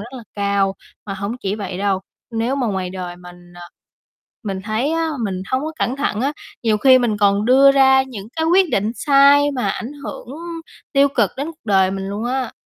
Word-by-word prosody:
rất 235 +5 -9
là 245 - -9
cao. 200 -1 0 0.3
Mà 195 - -4
hổng 200 +4 -4
chỉ 195 0 -2
vậy 190 -3 -5
đâu, 195 -1 0 0.3
nếu 235 +4 -1
mà 255 - 0
ngoài 190 -4 -2
đời 180 -1 -6
mình 175 0 -14
ờ, 175 - -12 0.8
mình 195 -3 -4
thấy 230 +8 -1
á, 330 0 0 0.2
mình 185 -2 -3
hông 260 +1 +1
có 315 - -4
cẩn 255 +3 -1
thận 250 -6 -1
á, 275 +3 0 0.3
nhiều 215 -2 +2
khi 260 +2 +6
mình 235 -4 0
còn 200 0 +3
đưa 270 +3 +6
ra 265 -1 +5
những 225 -6 -9
cái 320 0 0
quyết 370 -2 +4
định 210 +3 0
sai 285 +1 +5
mà 255 -3 -1
ảnh 245 +5 -5
hưởng 270 -3 -7 0.6
tiêu 280 0 +4
cực 235 -8 +1
đến 280 +2 -3
cuộc 325 0 -11
đời 190 -3 +3
mình 195 0 -4
luôn 205 +3 -4
á. 255 0 -2
225 Hz, 215 wpm, -19 LUFS, 195-270 Hz, 0.8 s, khi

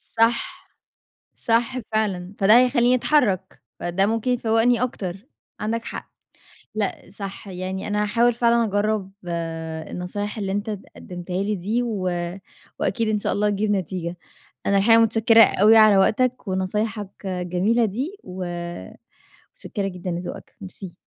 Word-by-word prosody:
صح، 235 +12 +1 0.7
صح 235 +3 +1
فعلًا، 200 -3 -1
فده 210 +5 +7
هيخليني 250 -1 +4
اتحرك، 250 -8 +1 0.2
فده 185 +3 +1
ممكن 225 +3 0
يفوَّقني 235 0 +2
أكتر، 190 -7 -3 0.4
عندك 225 +2 -2
حق، - - -7 0.6
لأ، 210 -2 -3
صح. 200 0 -7
يعني 185 +1 -4
أنا 210 0 0
هاحاول 235 +3 +2
فعلًا 235 0 +3
أجرَّب 205 -2 -1 0.8
النصايح 205 +4 -4
اللي 195 -2 -2
أنت 205 +2 -2
اد 205 -2 -4
قدّمتها 180 +1 -5
لي 210 +1 0
دي، 215 +7 -1
و 220 -5 -3 0.8
وأكيد 230 -2 0
إن 215 -1 +1
شاء - - -1
الله 210 0 +1
تجيب 205 +1 0
نتيجة. 180 -2 -2 0.5
أنا 200 - +3
الحقيقة 225 +3 +6
متشكِّرة 225 0 +6
أوي 215 +3 +5
على 215 -2 +7
وقتك 250 +4 +2
ونصايحك 205 +2 -2 0.2
الجميلة 185 +5 +1
دي، 265 - -3
و 185 0 -6 1.1
متشكِّرة 200 -1 -4
جدًا 180 -1 -5
لذوقك، 175 +1 -6
ميرسي. 190 -1 -7
210 Hz, 135 wpm, -23 LUFS, 190-230 Hz, 1.1 s, فده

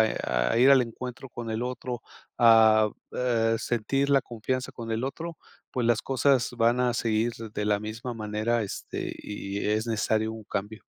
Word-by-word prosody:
a 65 - +1
a 115 - +2
ir 130 +3 +7
al 135 -1 +7
encuentro 125 +2 -7
con 120 -1 -7
el 110 +2 -2
otro, 125 -1 -4 0.4
a 110 -2 +6 0.2
eh, 115 -3 +1
sentir 125 +5 0
la 140 -1 +5
confianza 125 +3 -3
con 115 -1 -7
el 110 +3 -1
otro, 165 +5 -5 0.3
pues 120 -2 -1
las 120 -2 +3
cosas 135 -1 +2
van 120 +2 +3
a 125 -1 +2
seguir 115 0 +1
de 110 -2 -5
la 105 -1 +2
misma 115 +3 -5
manera, 110 +1 -1
este, 100 - -5
y 100 -1 -5
e 105 +1 +1
es 110 +2 -1
necesario 110 0 0
un 110 0 -8
cambio. 105 +1 -4
115 Hz, 180 wpm, -27 LUFS, 110-125 Hz, 0.4 s, ir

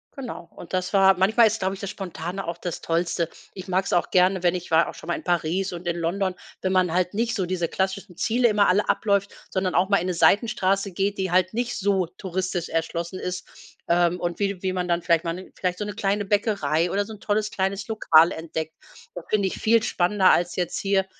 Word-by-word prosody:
Genau. 250 -10 -7
Und 175 - -11
das 185 +1 -1
war 195 -1 +6
manchmal, 215 +6 +4
ist, 220 +1 +1
glaube 190 0 -1
ich, - - -12
das 200 0 -4
Spontane 185 -1 -5
auch 170 0 -3
das 175 -1 -5
Tollste. 170 0 -1 0.2
Ich 185 -1 -9
mag's 190 +1 0
auch 175 - +2
gerne, 185 0 +3
wenn 175 0 +2
ich 180 -1 -6
war 165 +1 +4
auch - - -9
schon - - -12
mal - - +2
in - - -7
Paris 175 +2 0
und 175 +1 -7
in 170 - 0
London 180 +3 -1 0.3
wenn 185 - 0
man 185 -2 +2
halt 180 +2 0
nicht 230 +2 0
so 190 - -1
diese 175 -1 -1
klassischen 190 -1 -3
Ziele 240 +4 +2
immer 210 -2 +3
alle 195 +3 +2
abläuft, 200 -2 +1 0.2
sondern 185 -2 -1
auch 185 +2 +3
mal 200 - +4
in 180 - -2
'ne 180 - -1
Seitenstraße 195 0 +2
geht, 195 +2 -1
die 190 -1 -1
halt 185 +1 +2
nicht 240 +1 -2
so 195 -3 +1
touristisch 185 -1 -4
erschlossen 170 +2 -3
ist, 180 0 -5 0.4
ähm, 175 +1 +2
und 175 -1 -3
wie 200 -2 -1
wie 185 -1 0
man 180 -1 -2
dann 170 -1 0
vielleicht 170 -2 +2
mal 165 - -2
'ne 185 +1 -10
vielleicht 180 -1 -2
so 210 - -3
'ne 205 - -5
kleine 200 +1 -1
Bäckerei 200 -5 +1
oder 200 +1 0
so 220 - -9
’n 210 - -12
tolles 210 +1 -1
kleines 195 +1 -2
Lokal 170 -7 +5
entdeckt. 160 -1 -5 0.4
Das - - -7
finde 200 -2 +2
ich - - -5
viel 225 0 +4
spannender, 190 -1 +3
als 175 0 +1
jetzt 180 -2 -2
hier, 195 -1 +1
185 Hz, 230 wpm, -24 LUFS, 175-200 Hz, 0.4 s, war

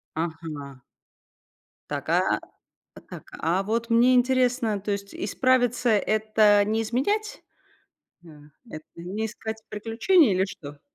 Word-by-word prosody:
Ага. 155 -4 -5 1.1
Так, - - -4
а - - +2 0.7
Так, - - -9 0.2
а 175 +4 0
вот 230 +3 -2
мне 240 +2 +4
интересно, 250 -4 +1
то 205 - -3
есть 200 0 -5
исправиться- 245 +3 +1
это 215 -1 +3
не 220 +2 0
изменять? 405 - -2 0.8
А, - - -13 0.4
это 155 -4 -9
не 190 +6 -4
искать 220 0 -7
приключений, 225 - +2
или 185 +1 +2
что? 145 -6 -10
215 Hz, 115 wpm, -25 LUFS, 190-245 Hz, 1.1 s, мне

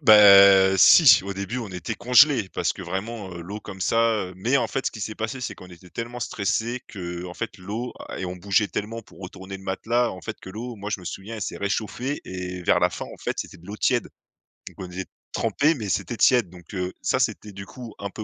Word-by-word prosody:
Bah 100 -5 +8
si, - - +8
au 100 0 -4
début, 100 +5 -4
on 115 -4 -5
était 90 -3 -5
congelés 125 -3 +5
parce - - 0
que - - -11
vraiment, 100 0 -5
heu, 85 - -7
l'eau 100 +5 -7
comme 95 -2 -10
ça, 115 +5 +1 0.3
heu, - - -11
mais 120 +8 +1
en 130 - +1
fait, 135 - -3
ce - - +1
qui 110 - -10
s'est 110 +2 -4
passé, 115 +4 -4
c'est 125 - -4
qu'on 90 - -13
était 90 0 -15
tellement 120 +1 -6
stressés 115 +3 -2
qu'en 90 -2 -6
fait 115 -3 -5
l'eau 110 +7 -5 0.2
a - - -6
et - - -3
on 90 0 -4
bougeait 100 +3 +1
tellement 115 +2 -4
pour - - -18
retourner 95 +1 -8
le 95 - -14
matelas 115 +6 0
en 95 - -8
fait, 110 - -7
que - - -11
l'eau, 120 +4 -6
moi, 100 0 -6
je 105 - -1
me 90 - -12
souviens, 105 +6 -6
elle 105 - -5
s'est - - -4
réchauffée 110 +7 -2
et 90 -1 -6
vers - - +3
la - - +4
fin, - - -6
en - - -10
fait, - - -3
c'était - - -6
de 85 - -17
l'eau 105 - -7
tiède, 120 +2 +1 0.6
donc - - -9
on 90 -1 -7
était 95 +1 -5 0.3
trempés, 155 +3 +1
mais 110 -6 -5
c'était 115 +4 -2
tiède, 120 -7 +4
donc 90 +1 -14
heu, 90 -1 -3
ça - - +1
c'était, 105 - -1
du 100 0 -8
coup, 120 -1 -10
un 100 0 -4
peu 110 - -7
100 Hz, 245 wpm, -24 LUFS, 95-115 Hz, 0.6 s, Bah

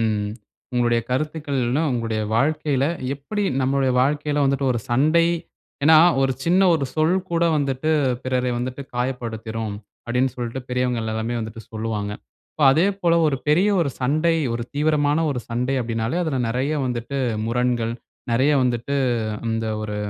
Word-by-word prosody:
ம், 105 -2 0 0.4
உங்களுடைய 120 -1 +2
கருத்துக்கள்லா 140 -1 -1
உங்களுடைய 115 -3 -1
வாழ்க்கையில 145 0 +1 0.3
எப்படி 205 +10 -3 0.2
நம்மளுடைய 135 0 +1
வாழ்க்கையில 145 +1 0
வந்துட்டு 135 0 +1
ஒரு 120 - -2
சண்டை, 155 +7 +4 0.6
ஏன்னா 160 0 +8 0.2
"ஒரு 135 - +2
சின்ன 180 +3 +3
ஒரு 140 -4 -1
சொல் 160 +3 +2
கூட 170 0 +2
வந்துட்டு 140 +1 -1 0.3
பிறரை 125 -1 0
வந்துட்டு 130 +3 -4
காயப்படுத்திரும்" 115 -4 -3 0.3
அப்படின்னு 125 +2 0
சொல்லிட்டு 120 +1 -4
பெரியவங்க 125 -1 0
எல்லாருமே 110 +2 -2
வந்துட்டு 110 0 -7
சொல்லுவாங்க. 110 -2 -3 0.4
இப்போ 150 - +1
அதேபோல 180 +1 +2
ஒரு 140 -3 +1
பெரிய 180 +7 +4
ஒரு 150 -5 +1
சண்டை, 155 +6 +2 0.2
ஒரு 120 0 -2
தீவிரமான 150 0 +2
ஒரு 130 -3 -2
சண்டை 125 +3 -1
அப்டினாலே 115 +3 -2
அதுல 155 -6 -1
நிறைய 130 +6 -1
வந்துட்டு 120 +2 -3 0.3
முரண்கள், 120 -1 0 0.4
நிறைய 130 +6 +3
வந்துட்டு 125 +3 -1 0.5
இந்த 115 0 -1 0.2
ஒரு 105 -1 -4
130 Hz, 135 wpm, -22 LUFS, 115-150 Hz, 0.6 s, ஏன்னா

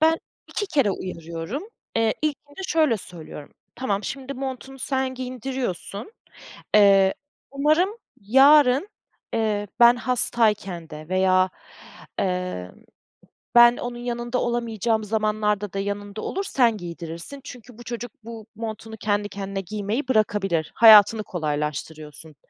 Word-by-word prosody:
Ben 320 +1 +4 0.3
2 410 - -3
kere 280 - +2
uyarıyorum, 170 - -5 0.3
eee, 225 -1 +2
ilkinde 290 +2 -4
şöyle 310 -8 +2
söylüyorum, 165 -6 -9 0.2
tamam 210 -5 -2
şimdi 275 +3 -5
montunu 265 0 -6
sen 265 0 -1
giydiriyorsun, 255 - -5 0.6
eee, 195 -2 +6 0.4
umarım 305 +7 +2 0.3
yarın, 270 - +5 0.5
eee, 210 -2 0
ben 240 +1 +8
hastayken 215 -8 0
de 155 0 -9
veya, 185 0 +3 0.7
eee, 180 - -2 0.9
ben 240 0 +8
onun 245 0 -5
yanında 240 0 -3
olamayacağım 230 -2 -1
zamanlarda 210 -1 -1
da 195 - -2
yanında 205 +1 -4
olur, 390 - -3
sen 240 - +2
giydirirsin. 170 - -7
Çünkü 250 -4 -12
bu 240 - -11
çocuk, 240 -1 -6
bu 225 -1 -9
montunu 220 0 -6
kendi 205 0 -1
kendine 195 -1 -5
giymeyi 210 - -3
bırakabilir, 195 -8 +1
hayatını 215 -1 +8
kolaylaştırıyorsun. 150 -1 -5
220 Hz, 115 wpm, -24 LUFS, 195-250 Hz, 0.9 s, ben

